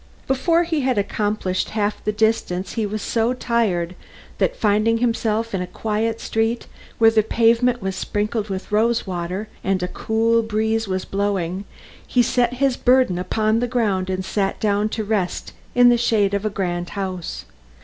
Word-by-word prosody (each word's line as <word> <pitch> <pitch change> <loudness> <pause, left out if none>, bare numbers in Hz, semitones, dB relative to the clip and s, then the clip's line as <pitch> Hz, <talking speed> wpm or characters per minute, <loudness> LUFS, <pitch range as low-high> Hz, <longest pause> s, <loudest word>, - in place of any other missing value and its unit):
Before 330 +6 +2
he 325 -3 -1
had 255 -3 +1
accomplished 205 -2 -1
half 205 0 -1
the 210 - 0
distance 210 -4 0
he 220 -3 -1
was 210 0 -4
so 230 +1 +1
tired 210 -9 0 0.5
that, - - +1
finding 215 +2 +2
himself 230 -1 0
in 190 - -1
a 180 - -3
quiet 220 +3 -2
street 225 +2 -1 0.3
where 225 -1 +6
the 220 -1 +4
pavement 235 +2 +2
was 190 -1 -2
sprinkled 210 +2 -2
with 190 +1 -5
rose 230 +2 +2
water, 185 +2 -4 0.2
and 190 -1 0
a - - 0
cool 225 +4 +1
breeze 220 0 0
was 185 -1 -2
blowing, 195 -2 -2 0.4
he 245 - +3
set 245 0 +1
his 270 -1 +1
burden 250 -8 +3
upon 215 +4 +1
the 245 - 0
ground, 205 -6 0
and 185 0 -2
sat 195 0 -1
down 210 0 +1
to 220 - -3
rest 205 -4 -2 0.2
in 245 0 +7
the 240 -1 +4
shade 210 -4 +2
of 200 +1 -1
a - - +2
grand 175 -3 -3
house. 185 -3 -4
215 Hz, 170 wpm, -21 LUFS, 195-230 Hz, 0.5 s, in